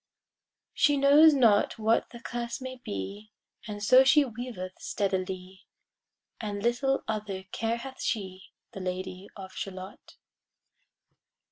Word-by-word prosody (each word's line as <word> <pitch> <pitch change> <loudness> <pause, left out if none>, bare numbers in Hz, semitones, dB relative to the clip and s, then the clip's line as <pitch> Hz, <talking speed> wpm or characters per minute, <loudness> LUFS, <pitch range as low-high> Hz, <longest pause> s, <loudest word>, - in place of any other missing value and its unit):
She 290 -1 +3
knows 290 +3 +7
not 225 -6 +4
what 225 +1 +1
the 235 - -11
curse 235 -1 -4
may 255 0 -7
be, 200 - -6 0.4
And 205 -1 -6
so 255 +5 +7
she 285 +2 +5
weaveth 230 -6 -6
steadily, 190 -1 -3 0.7
And 205 -2 -4
little 270 +3 +1
other 210 -3 -3
care 230 +1 -1
hath 265 +2 -9
she, 190 -4 -3 0.3
The 210 - -8
Lady 185 +1 -5
of 190 -2 -9
Shalott. 190 0 -8
215 Hz, 120 wpm, -28 LUFS, 190-250 Hz, 0.7 s, knows